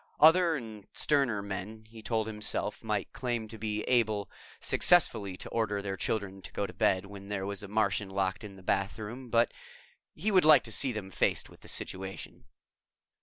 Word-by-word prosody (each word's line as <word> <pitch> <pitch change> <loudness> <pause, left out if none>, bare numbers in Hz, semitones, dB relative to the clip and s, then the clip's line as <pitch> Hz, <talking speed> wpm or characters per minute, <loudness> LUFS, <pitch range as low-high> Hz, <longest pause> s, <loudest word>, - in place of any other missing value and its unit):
Other 165 +2 +6
and 110 -7 -8
sterner 130 -9 +2
men, 100 +3 -6
he 110 0 -12
told 110 -1 0
himself, 105 -1 -2
might - - -2
claim 120 -3 -2
to 110 0 -9
be 105 0 -2
able 110 -5 +1 0.3
successfully 95 -2 +4
to - - -6
order 110 -3 0
their 100 -1 -3
children 95 -1 -3
to - - -9
go 100 - -1
to - - -8
bed 95 0 +2
when 100 0 -10
there 95 -2 -2
was 100 0 -2
a 100 - -7
Martian 100 -1 0
locked 95 +1 -1
in 100 -2 -9
the 95 - -14
bathroom, 110 +7 -2
but 115 0 +3 0.6
he 205 +8 0
would 185 -2 +5
like 155 0 +7
to 115 - -8
see 130 +4 +1
them 105 -4 -6
faced - - 0
with - - -16
the - - -15
situation. 95 0 -4
105 Hz, 185 wpm, -30 LUFS, 100-115 Hz, 0.6 s, like